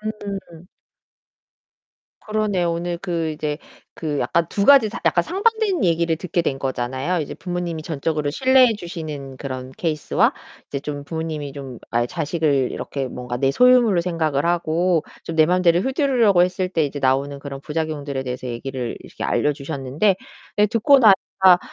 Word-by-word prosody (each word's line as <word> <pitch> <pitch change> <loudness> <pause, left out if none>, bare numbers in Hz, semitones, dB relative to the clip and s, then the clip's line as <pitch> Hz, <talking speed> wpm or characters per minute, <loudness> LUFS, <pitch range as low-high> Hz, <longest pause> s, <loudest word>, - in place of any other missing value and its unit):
음음음. 200 -5 -6 1.5
그러네요. 210 -5 0
오늘 170 +1 -3
그 170 -4 -2
이제 150 -1 -3 0.4
그 150 -3 -3
약간 170 -1 +1
2 200 - -1
가지 275 -5 +7
상 - - -7
약간 - - +3
상반된 400 - +1
얘기를 170 -1 +2
듣게 175 0 -1
된 135 -4 -2
거잖아요. 130 +6 -2
이제 145 - -5
부모님이 175 -3 -4
전적으로 155 -1 -2
신뢰해 260 - +4
주시는 155 -8 -7
그런 130 -1 -6
케이스와 155 0 +1 0.4
이제 140 - -3
좀 145 0 -5
부모님이 155 -3 -4
좀 135 -4 -8
아예 120 0 +1
자식을 150 -4 0
이렇게 135 -2 -4
뭔가 125 -1 -5
내 135 0 +2
소유물로 245 - +5
생각을 160 -4 0
하고 170 0 +1 0.2
좀 165 - -5
내 - - +3
마음대로 180 -1 +3
휘두르려고 255 - +3
했을 185 +1 0
때 165 -4 +1
이제 145 0 -4
나오는 135 +2 +1
그런 140 -1 -7
부작용들에 150 -3 -3
대해서 125 0 -5
얘기를 125 0 -4
이렇게 - - -8
알려주셨는데. 145 +5 0 0.4
예, 210 - +6
듣고 235 +6 +4
나니까 190 -3 +5
165 Hz, 360 characters per minute, -22 LUFS, 140-185 Hz, 1.5 s, 가지